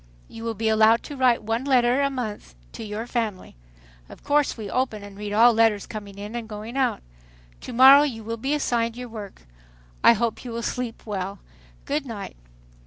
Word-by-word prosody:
You 225 - -10
will 230 -1 -3
be 220 +2 -2
allowed 220 +1 +4
to 290 - -8
write 255 -4 +2
one 225 +3 -1
letter 255 -1 +3
a 280 - +2
month 220 - -6 0.2
to - - -8
your 215 +1 -5
family. 225 - -4 0.5
Of - - -14
course 290 -2 +1
we 215 -2 -6
open 225 -2 -2
and 200 -1 -11
read 205 0 -6
all 230 +3 +6
letters 225 -2 +2
coming 205 -2 -9
in 205 +3 -7
and 230 -2 -5
going 215 +3 -7
out. 265 - 0 0.6
To - - -8
morrow 265 +4 +8
you 245 -7 -2
will 230 +1 -4
be 270 +6 -1
assigned 235 -5 -1
your 250 -1 -7
work. 210 - -9 0.6
I - - +8
hope 230 0 -2
you 250 - -7
will 230 0 -4
sleep 245 -2 -4
well. 200 -2 -4 0.5
Good 290 -1 -2
night!" 205 - -7
230 Hz, 195 wpm, -24 LUFS, 210-250 Hz, 0.6 s, morrow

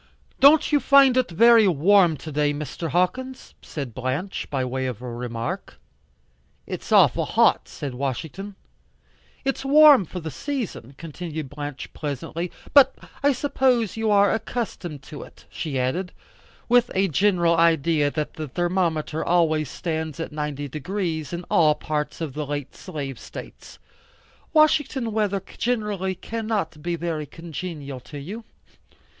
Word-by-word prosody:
"Don't 290 +4 +6
you 295 - +4
find 275 -2 +6
it 255 -1 +2
very 225 +4 +6
warm 175 0 +4
to 155 +3 -8
day, 145 0 +1
Mr. 150 +2 -5
Hawkins?" 255 - -1
said 135 -7 -6
Blanche, 130 - -3
by 135 -3 -1
way 130 +1 -2
of 125 -5 -5
a 125 - -8
remark. 115 -1 -5 0.9
"It's - - -7
awful - - +5
hot," - - +3
said 140 -3 -6
Washington. 155 +10 -4 0.9
"It's 270 0 -1
warm 285 -5 +7
for 180 - -7
the 160 -2 -6
season," 230 - -5
continued 160 -2 -6
Blanche 145 -2 -7
pleasantly. 155 +4 -4 0.2
"But 280 -2 +7 0.3
I 285 - +4
suppose 255 -4 +1
you 225 -1 -1
are 200 -1 +4
accustomed 220 - -4
to 145 - -9
it," - - -14
she 150 -5 -4
added, 175 +9 -2 0.5
with 245 0 +4
a 195 +1 +3
general 175 0 +2
idea 160 -2 +3
that 150 +1 -3
the 155 -3 -6
thermometer 170 -1 -1
always 160 -3 +2
stands 160 -3 -4
at 165 - -4
90 150 -1 -4
deg. 150 +4 -8
in 170 -4 -2
all 155 -3 +4
parts 150 +1 -3
of 155 -5 -3
the 150 0 -4
late 145 -2 -4
slave 145 -8 -6
states. - - -11 0.7
"Washington 295 -6 +3
weather 205 -3 0 0.2
generally 210 -6 -1
cannot 215 -8 -3
be 170 +2 -2
very 165 -3 -3
congenial 160 -5 -7
to 135 +4 -11
you?" 205 +11 -7
170 Hz, 140 wpm, -24 LUFS, 145-210 Hz, 0.9 s, warm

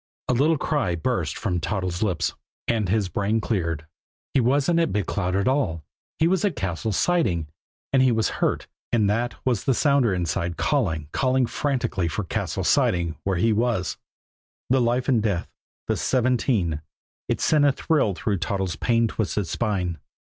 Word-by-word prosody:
A - - +2
little 150 +6 +3
cry 130 - 0
burst 85 - -1
from 90 -6 -1
Toddles' 90 0 -2
lips 90 -7 0 0.3
and 110 -5 +1
his 105 -1 +1
brain 100 +5 0
cleared. 85 -9 -2 0.5
He 135 - +4
wasn't 140 +7 +2
at 165 -1 +1
Big 105 -2 0
Cloud 90 -2 -1
at 100 +3 +1
all 115 - 0 0.3
he 160 - +3
was 185 +2 +1
at 205 -4 +1
Cassil's 95 +2 -2
Siding 110 - +1 0.5
and 135 - +5
he 130 -1 +5
was 110 -2 +2
hurt - - +1 0.3
and 110 -4 +3
that 120 +3 -1
was 125 -5 0
the 135 - +3
sounder 140 -6 +3
inside 85 -2 -1
calling, 85 - 0
calling 130 -1 +2
frantically 120 - -1
for 85 +6 -2
Cassil's 90 - -2
Siding 85 -2 +2
where 95 -2 +1
he 110 +5 +3
was. 110 -5 0 0.7
The 130 -1 +4
life 120 +2 +1
and 125 -5 +3
death 100 -5 -1 0.4
the - - +1
seventeen 120 - +1 0.5
it - - 0
sent 150 -2 +3
a 140 - +5
thrill 135 - +1
through 100 +2 -1
Toddles' 95 +2 -2
pain 115 -1 +2
twisted 105 -2 -1
spine. 90 -4 -1
110 Hz, 170 wpm, -24 LUFS, 90-130 Hz, 0.7 s, and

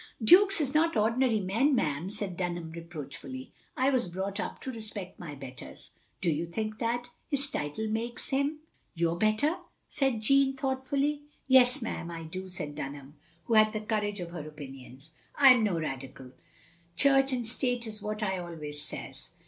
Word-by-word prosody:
"Dukes 390 - +7
is 280 -3 0
not 320 -3 +3
ordinary 230 +1 +3
men, 225 +10 +2
ma'am," 155 - 0
said 205 -3 -4
Dunham 175 -2 -3
reproachfully, 170 - -7
" - - -32
I 260 +2 +3
was 250 -6 +1
brought 190 +3 -3
up - - -4
to 260 - -4
respect 215 -5 -7
my 155 -5 -7
betters. 130 - -10
" - - -37
i - - -36 0.2
"Do 175 - +2
you 160 +3 -1
think 215 +5 -4
that 240 +1 -1
— - - -41
^his 280 0 0
title 150 +10 -2
makes 230 +2 -3
him 280 +3 0 0.2
— - - -42
your 170 0 +1
better?" 215 - +2 0.3
said 265 -5 0
Jeanne, 275 +3 +4
thoughtfully. 275 +2 0 0.3
"Yes, 250 -2 +6
ma*am, 170 -6 -4
I 165 -1 -6
do," 185 +4 -6
said 150 -5 -5
Dunham, 140 0 -7 0.3
who 230 - -2
had 215 -1 +6
the 215 - -1
courage 210 -1 -1
of 175 -1 -5
her 160 -3 -6
opinions. 135 -1 -10
" - - -31
I 270 -3 +9
'm 240 -3 +2
no 200 -5 +1
Radical. 135 -3 -6 0.6
Church 270 +5 +4
and 245 -3 -1
State 245 0 +1
is 215 -1 -6
what 215 +1 -3
I 190 -2 0
always 155 -4 -5
says. 135 -2 -6
215 Hz, 190 wpm, -30 LUFS, 165-260 Hz, 0.6 s, I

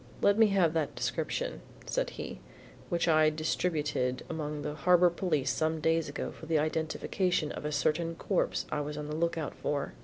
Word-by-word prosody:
"Let 200 - +6
me 220 0 +6
have 190 -5 +3
that 160 -3 -1
description," - - -2 0.2
said - - -1
he, 65 - -6 0.5
"which 170 0 +1
I 155 -1 +5
distributed 150 -4 -1
among 150 -2 -3
the 150 - -3
Harbor 175 +3 +5
Police 155 -7 0
some 160 0 0
days 160 -1 +1
ago 145 - -4
for 160 - -11
the 160 -1 +2
identification 155 +2 0
of - - -6
a 150 - -1
certain 160 +3 0
corpse 190 +3 0
I 150 - 0
was 150 +1 -4
on 150 - -4
the 150 - -3
lookout 165 -2 -1
for." 145 -1 -2
155 Hz, 180 wpm, -31 LUFS, 150-170 Hz, 0.5 s, Let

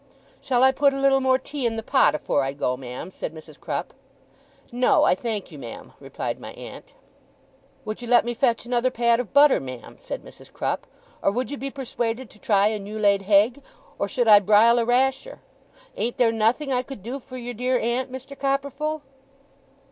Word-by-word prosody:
'Shall 250 -1 +1
I 265 - +7
put 280 +1 +2
a - - -3
little 275 0 +4
more 260 0 +3
tea 270 -1 -3
in 225 - -2
the 225 - -4
pot 265 - +3
afore 145 - 0
I 135 0 -2
go, 130 -3 -1
ma'am?' 125 +6 -8
said 160 - -6
Mrs. 155 -1 -13
Crupp. - - -4 0.8
'No, 245 +1 +3
I - - +5
thank 210 -1 -4
you, 150 - -10
ma'am,' 120 -4 -9
replied - - -5
my - - -9
aunt. - - -11 0.9
'Would 215 +2 -5
you 240 - -7
let 240 0 +4
me 240 - -2
fetch 235 -1 +1
another 245 +1 +1
pat 235 -1 +2
of 245 -5 -4
butter, 285 0 +6
ma'am?' 130 -3 -9
said - - -6
Mrs. - - -15
Crupp. - - -3 0.3
'Or - - +3
would 245 +6 -2
you 285 - -4
be 275 +1 -4
persuaded 245 -3 -4
to 210 - -17
try 205 -1 +3
a 215 -1 -3
new 205 +2 -7
laid 200 -2 +3
hegg? 210 +7 +3 0.4
or - - 0
should 245 -4 0
I 210 -2 +9
brile 215 +4 +5
a 230 - +1
rasher? 265 - 0 0.6
Ain't 235 +1 -2
there 235 -2 +4
nothing 230 +6 +1
I 250 - +2
could 255 -6 -10
do 250 +5 -5
for 255 0 -10
your 245 0 -6
dear 250 +2 0
aunt, 245 +3 -1
Mr. 265 +2 -8
Copperfull? 280 +3 -2
240 Hz, 200 wpm, -24 LUFS, 210-265 Hz, 0.9 s, I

